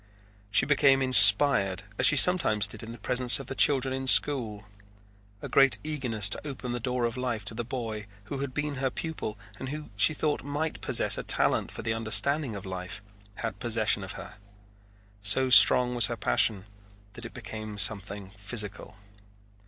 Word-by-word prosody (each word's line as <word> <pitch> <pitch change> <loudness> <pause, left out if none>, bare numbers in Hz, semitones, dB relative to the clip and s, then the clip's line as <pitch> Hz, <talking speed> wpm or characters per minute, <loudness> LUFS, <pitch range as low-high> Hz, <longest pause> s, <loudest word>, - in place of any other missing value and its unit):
She 110 +6 +2
became 140 -2 +2
inspired 105 -5 +5 0.2
as - - +6
she 150 - +4
sometimes 135 - +4
did 105 - -12
in 115 0 -10
the 120 - -11
presence 125 +4 +4
of 135 - -9
the 130 - -7
children 135 -1 +1
in 130 0 -6
school. 115 -7 +2 0.8
A - - -5
great 135 -1 +2
eagerness 125 -10 -3
to 150 - -6
open 130 -3 -8
the 120 - -4
door 125 0 -3
of 115 +1 -5
life 120 -5 -5
to 100 - -4
the 120 +2 -6
boy, 115 -4 -7 0.2
who 135 +7 -8
had 140 -1 -5
been 145 +2 -5
her 135 0 -2
pupil 150 -7 -7 0.2
and 130 - -7
who 150 -2 -9
she 105 +10 +2
thought 150 0 -3
might 145 +3 -5
possess - - +1
a - - -6
talent - - 0
for - - -10
the 110 0 -3
understanding 115 +4 -1
of 100 - -10
life, 95 0 -8 0.3
had - - -7
possession 110 -4 -1
of 95 - -9
her. 100 - -12 0.8
So 130 +6 +1
strong 125 0 +6
was 120 -4 +5
her - - -6
passion 95 - 0 0.5
that 120 - -12
it 115 - -11
became 110 -1 -9
something 100 -1 +1
physical. 105 0 -5
120 Hz, 180 wpm, -26 LUFS, 105-135 Hz, 0.8 s, as